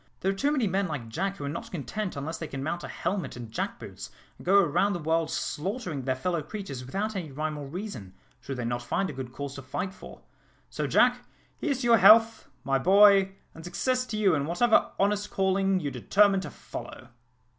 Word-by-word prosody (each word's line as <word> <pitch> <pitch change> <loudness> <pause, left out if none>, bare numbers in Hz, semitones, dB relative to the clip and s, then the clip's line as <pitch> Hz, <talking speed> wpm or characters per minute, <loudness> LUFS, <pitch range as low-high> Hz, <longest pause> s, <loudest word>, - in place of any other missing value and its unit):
There 190 - +2
are - - -4
too 280 +9 +1
many 270 -6 +1
men 195 0 0
like 140 -8 -5
Jack 195 - -2
who - - -7
are - - -3
not 225 +11 -5
content 190 +3 -4
unless 150 +4 -4
they 160 - -4
can 135 -2 -5
mount 170 +4 -3
a - - -5
helmet 185 -9 -3
and 120 -2 -8
jackboots, - - -5 0.3
and - - -13
go 200 +1 +6
about 195 +6 +1
the - - -1
world 160 0 0
slaughtering 180 - -3
their 130 -1 +1
fellow 170 +5 -1
creatures 150 - -6
without 200 +12 -3
rhyme 155 -4 -4
or 145 -2 -6
reason, 140 - -7 0.2
should 135 +1 -6
they 120 - -3
not 120 +1 -2
find 190 +10 -1
a - - -10
good 130 -2 -6
cause 140 +1 -6
to 140 - -8
fight 185 +8 -4
for. - - -12 0.5
So, - - -2
Jack, - - +3 0.3
here's 280 -4 -2
to - - -2
your 235 -1 +6
health, 225 +3 +6
my 135 -1 +1
boy, 195 +3 +6 0.2
and 165 - -11
success 255 +8 0
to 215 - -4
you 200 -4 +3
in 145 -2 0
whatever 220 +8 +3
honest 205 +1 +1
calling 195 0 +1
you 145 -5 -3
determine 200 +3 +3
to 190 - -6
follow!" 125 - -9
180 Hz, 210 wpm, -28 LUFS, 140-200 Hz, 0.5 s, go